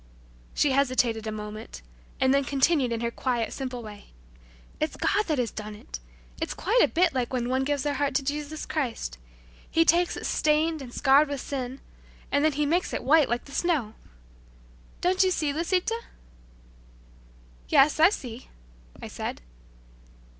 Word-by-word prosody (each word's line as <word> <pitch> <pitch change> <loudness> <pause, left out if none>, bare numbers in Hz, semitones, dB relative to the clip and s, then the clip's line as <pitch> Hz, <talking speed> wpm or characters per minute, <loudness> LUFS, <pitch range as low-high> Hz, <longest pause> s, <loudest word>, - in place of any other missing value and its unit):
She 290 - +3
hesitated 250 -5 +1
a - - -2
moment, 210 - -7 0.4
and 260 0 +4
then 280 0 +3
continued 275 -1 +2
in 230 0 -2
her 235 0 -1
quiet, 240 -2 -1
simple 255 -3 -5
way. 210 -2 -10 0.7
"It's 310 - -1
God 415 +1 +1
that 310 -3 0
has 245 -3 0
done 215 0 -7
it! 210 - -9 0.4
It's - - -2
quite 455 +7 +2
a - - +6
bit 345 0 +2
like 255 -3 -1
when 245 -2 -1
one 260 +1 +1
gives 285 0 -1
their 290 - 0
heart 285 0 -1
to 275 - +2
Jesus 295 +2 -4
Christ. 235 - -3 0.5
He 330 0 +3
takes 345 +1 +3
it - - -6
stained 310 +1 +1
and 250 -3 -8
scarred 280 +3 +4
with 285 -1 -3
sin, 260 0 -5 0.5
and 285 +1 +2
then 310 -1 +3
He 295 +1 0
makes 340 +5 0
it - - -2
white 305 +1 +5
like 240 +1 -1
the - - -13
snow. 280 -9 0 1.1
Don't 365 +1 +2
you 375 - +3
see, 305 -5 0
Lisita?" 365 +8 0 1.7
"Yes, 285 +3 +5
I 325 +3 +8
see," 250 - -7 0.5
I - - -7
said. - - -5
280 Hz, 170 wpm, -27 LUFS, 245-310 Hz, 1.7 s, I